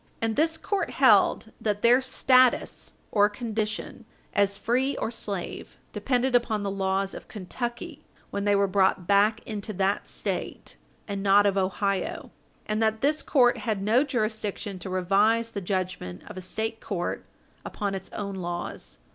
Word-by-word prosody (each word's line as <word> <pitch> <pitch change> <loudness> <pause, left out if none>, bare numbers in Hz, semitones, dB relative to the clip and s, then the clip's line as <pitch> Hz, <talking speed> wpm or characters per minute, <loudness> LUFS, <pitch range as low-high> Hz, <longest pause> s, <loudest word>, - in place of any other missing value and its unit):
And 225 -1 -1
this 320 +1 +2
court 400 +2 -2
held - - +4
that 210 -1 -1
their 245 +3 +6
status 255 -1 +2 0.2
or 205 -1 +4
condition 215 -1 -4 0.3
as 200 0 +2
free 255 +6 0
or - - -2
slave 200 -5 -5 0.2
depended 255 0 0
upon 230 -4 +2
the 200 - -2
laws 195 0 -1
of - - -9
Kentucky 235 +5 -5 0.3
when 200 - -2
they 205 0 +3
were 200 0 +3
brought 190 -2 +2
back 205 +3 +3
into 215 -1 -5
that 195 +1 0
State, - - -5 0.3
and 200 -2 -3
not 200 +1 +5
of 200 -1 +2
Ohio, 195 0 -1 0.3
and 215 +1 -1
that 220 0 +1
this 300 +2 +2
court 245 -4 +3
had 215 -4 -2
no 230 +6 +4
jurisdiction 215 -6 -3
to 185 - -6
revise 205 +5 +2
the 200 - -4
judgment 180 - -3
of 210 - -10
a 185 - -6
State 220 +4 -4
court 180 -4 -3 0.4
upon 200 -2 -3
its 190 -1 -5
own 200 -1 -4
laws. 175 - -5
205 Hz, 155 wpm, -26 LUFS, 195-230 Hz, 0.4 s, their